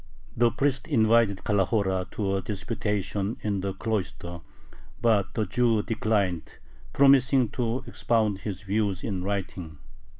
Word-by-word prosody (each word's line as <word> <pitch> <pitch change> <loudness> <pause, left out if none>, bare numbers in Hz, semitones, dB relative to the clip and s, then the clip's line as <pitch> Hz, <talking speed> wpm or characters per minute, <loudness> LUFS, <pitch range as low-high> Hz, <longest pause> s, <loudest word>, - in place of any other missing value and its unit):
The 120 0 +4
priest 135 +2 -1
invited 115 -6 +3
Calahora 95 -2 +1
to 100 -2 -2
a 95 - -1
disputation 105 0 -2
in 100 -3 -1
the 95 0 -3
cloister, 90 -5 -3 0.6
but 105 -5 +2
the 110 - 0
Jew 115 +1 +2
declined, 105 -6 -1 0.3
promising 135 -3 +5
to 120 +1 -2
expound 110 -4 0
his 100 -4 -5
views 100 -2 -1
in 95 -5 -3
writing. 95 -5 -4
105 Hz, 125 wpm, -26 LUFS, 95-115 Hz, 0.6 s, promising